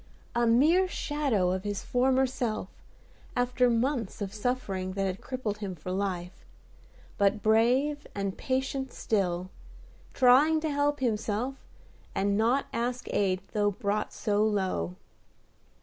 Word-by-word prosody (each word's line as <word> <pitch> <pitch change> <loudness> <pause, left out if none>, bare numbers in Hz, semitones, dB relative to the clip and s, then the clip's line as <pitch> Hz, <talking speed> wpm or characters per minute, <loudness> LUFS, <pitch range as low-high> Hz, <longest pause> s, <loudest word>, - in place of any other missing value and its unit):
A 235 0 +2
mere 310 +11 +5
shadow 280 - 0
of 185 0 -2
his 205 -1 -3
former 260 +1 +2
self, 235 -6 -3 0.7
after 250 0 +2
months 235 -2 0
of 200 -1 -4
suffering 205 -5 -2
that 195 0 -1
had 190 0 -3
crippled 230 -6 -4
him 195 -3 -4
for 175 +3 -6
life, 185 -2 -3 0.8
but 200 +1 +2
brave 250 +7 +2
and 200 -1 -2
patient 265 0 -2
still; 185 -4 -1 0.6
trying 280 +5 +5
to 310 -1 -1
help 290 0 +1
himself, 225 +1 -1 0.6
and 200 +1 +1
not 235 +6 +2
ask 245 +1 -2
aid 190 -2 +1
though 205 -1 +2
brought 205 +1 -2
so 210 0 0
low. 190 - 0
220 Hz, 130 wpm, -29 LUFS, 195-260 Hz, 0.8 s, mere